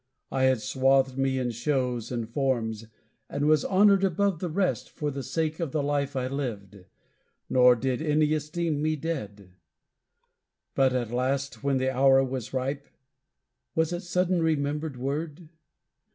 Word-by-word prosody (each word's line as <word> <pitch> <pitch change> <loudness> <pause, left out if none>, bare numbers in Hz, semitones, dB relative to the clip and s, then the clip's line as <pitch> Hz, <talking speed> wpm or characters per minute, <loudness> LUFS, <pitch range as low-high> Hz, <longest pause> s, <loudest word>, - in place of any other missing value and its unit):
I 130 -1 +2
had 130 -4 +2
swathed 135 +1 +2
me 135 0 0
in 125 -2 -1
shows 125 -1 -1
and 120 -2 -3
forms, 115 -4 -1 0.4
and 145 - -2
was 155 -1 +4
honored 195 0 +4
above 195 -1 +1
the 180 - -3
rest 185 +3 -1
For 150 -2 -3
the 140 0 -5
sake 160 +2 -2
of 165 -6 -3
the 150 - 0
life 140 -1 -1
I 130 -1 -1
lived; 105 -8 -5 0.7
nor 125 -1 +6
did 130 +3 -2
any 155 0 +2
esteem 155 0 -2
me 155 +1 +1
dead. 105 - -5 1.2
But 135 -1 +3
at 120 -3 -2
last, 135 +3 -1
when 140 -1 +1
the 130 0 0
hour 135 0 +5
was 130 -3 -4
ripe 135 +2 -3 0.9
was 160 +1 +1
it 175 - -3
sudden 180 0 0
remembered 150 -2 -1
word? 150 +5 -4
140 Hz, 150 wpm, -27 LUFS, 130-155 Hz, 1.2 s, nor